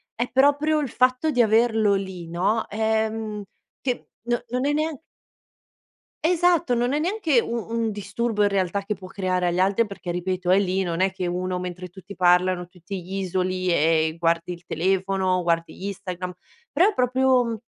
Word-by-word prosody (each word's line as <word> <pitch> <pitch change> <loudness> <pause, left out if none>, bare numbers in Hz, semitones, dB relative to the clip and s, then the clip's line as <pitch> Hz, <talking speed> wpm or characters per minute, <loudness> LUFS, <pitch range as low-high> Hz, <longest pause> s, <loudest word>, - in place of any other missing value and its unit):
È 240 +2 -2
proprio 290 +4 +3
il 285 -4 -2
fatto 255 +6 +2
di 250 -4 +3
averlo 220 -2 +3
lì, 190 -3 -4
no, 195 +6 0
ehm, 220 0 -1 0.4
che 250 -2 -3
no 240 0 -1
non 250 +2 -1
è 290 - +2
neanche 305 -1 -1 1.2
Esatto, 345 -5 +3
non 240 +1 +1
è 295 - +1
neanche 335 - +2
un 235 0 -2
un 230 -1 -1
disturbo 210 +2 -1
in 205 - +4
realtà 195 0 0
che 205 +2 -2
può 185 -2 -10
creare 185 -2 -1
agli 175 +1 0
altri, 195 +5 +3
perché 195 -3 -6
ripeto, 180 +1 -2
è 185 +2 +6
lì 190 -1 0
non 170 -2 -2
è 190 +1 +2
che 185 -2 -3
uno 180 +1 -2
mentre 180 0 -6
tutti 190 +3 -12
parlano, 180 -1 +3
tu 180 +1 -20
ti 185 +1 -6
isoli 185 0 -1
e 160 -1 +2
guardi 170 +1 +1
il 175 -1 -9
telefono, 185 +1 0
guardi 170 +2 -1
Instagram, 185 -2 -5 0.4
però 370 +4 +5
è - - -4
proprio 255 -1 +3
un 230 -2 -2
195 Hz, 175 wpm, -24 LUFS, 180-240 Hz, 1.2 s, è